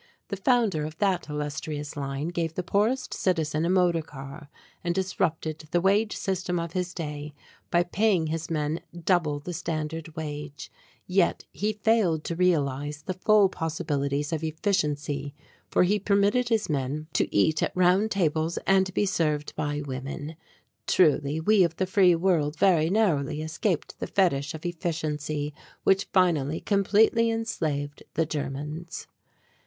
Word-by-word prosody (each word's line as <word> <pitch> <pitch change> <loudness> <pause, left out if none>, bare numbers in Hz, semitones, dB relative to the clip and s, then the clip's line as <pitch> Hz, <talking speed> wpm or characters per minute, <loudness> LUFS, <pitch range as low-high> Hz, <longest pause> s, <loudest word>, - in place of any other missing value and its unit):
The - - -2
founder 210 - +2
of 155 +1 -6
that 190 -5 0
illustrious 150 0 -4
line 140 +2 -3
gave 165 -2 -2
the 180 - -2
poorest 215 +8 0
citizen 160 -3 0
a - - 0
motor 180 -3 +3
car 140 0 -10 0.3
and 175 -1 -1
disrupted 160 -4 -1
the 175 - +2
wage 205 +4 +2
system 185 -2 -1
of 170 -1 -4
his 180 -1 -2
day 150 -3 -6 0.3
by 175 0 +3
paying 185 -1 +2
his 160 +1 -3
men 155 0 -1 0.2
double 165 -6 +2
the 175 +5 -6
standard 160 -1 -4
wage, 150 -1 -6 0.3
yet 185 -1 +1
he 210 +2 -1
failed 210 -7 +2
to 170 - -3
realize 145 -4 0
the 185 - -3
full 205 +2 +4
possibilities 150 -4 -2
of 160 0 -2
efficiency 150 -4 -1 0.3
for - - +3
he 205 +4 +2
permitted 205 +5 +2
his 225 -3 +1
men 145 +1 -2
to - - +1
eat 150 +10 +2
at - - +1
round 185 +4 +4
tables 165 -4 0
and 190 -1 +3
be - - +2
served 155 -6 -1
by 145 0 -2
women! 140 +3 -5 0.5
Truly 150 -3 +3
we 200 +4 +4
of 170 -1 0
the 190 - 0
free 185 -2 +4
world 165 -4 +1
very 165 -5 +4
narrowly 155 -8 +1
escaped 160 +2 -2
the - - -3
fetish 160 -5 +1
of 160 - -9
efficiency 155 -3 -2 0.3
which 195 0 +3
finally 160 -5 +2
completely 215 +3 +3
enslaved 155 -11 -2
the 165 - +2
Germans. 150 +2 -5
165 Hz, 150 wpm, -27 LUFS, 150-190 Hz, 0.5 s, full